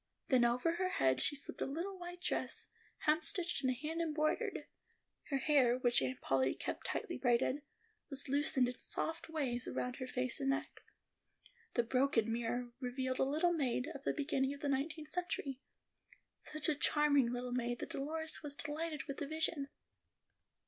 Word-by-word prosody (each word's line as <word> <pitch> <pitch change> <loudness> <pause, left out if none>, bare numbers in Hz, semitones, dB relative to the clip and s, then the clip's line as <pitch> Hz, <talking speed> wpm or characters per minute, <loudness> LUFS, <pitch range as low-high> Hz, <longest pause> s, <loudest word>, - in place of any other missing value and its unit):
Then 255 -3 +5
over 250 +8 +2
her 370 0 +1
head 130 - +2
she - - +2
slipped 280 - -6
a - - +1
little 340 +8 -3
white 355 -1 -8
dress, - - -1 0.4
hemstitched 335 0 +3
and 260 - +3
hand 310 +6 -3
embroidered. 310 -1 0 0.6
Her 275 - +1
hair, 265 -4 +4
which 245 - +3
Aunt 130 -1 -2
Polly 130 0 +2
kept - - -4
tightly - - -3
braided, 255 +3 +2 0.5
was 275 -1 +2
loosened 275 -2 +3
in 250 0 -5
soft 325 +1 -3
waves 260 -6 -1
around 250 +1 -2
her 255 - -4
face 255 -1 0
and 270 -1 0
neck. 275 - -2 0.9
The 240 - +4
broken 230 -2 +2
mirror 240 +1 -2
revealed 255 0 -2
a - - +5
little 310 +6 +2
maid 270 -2 0
of 280 -2 -9
the - - +1
beginning 280 -2 0
of 285 - -14
the 290 - 0
nineteenth 300 +3 -1
century; 295 -7 -2 0.8
such 310 +2 -1
a 310 - +4
charming 285 -4 +3
little 245 0 -3
maid, 240 -1 0
that - - -6
Dolores 315 +3 -2
was 290 -2 0
delighted 300 +1 -3
with 275 - -6
the 290 - -3
vision. 315 -2 -1
275 Hz, 170 wpm, -36 LUFS, 250-310 Hz, 0.9 s, Then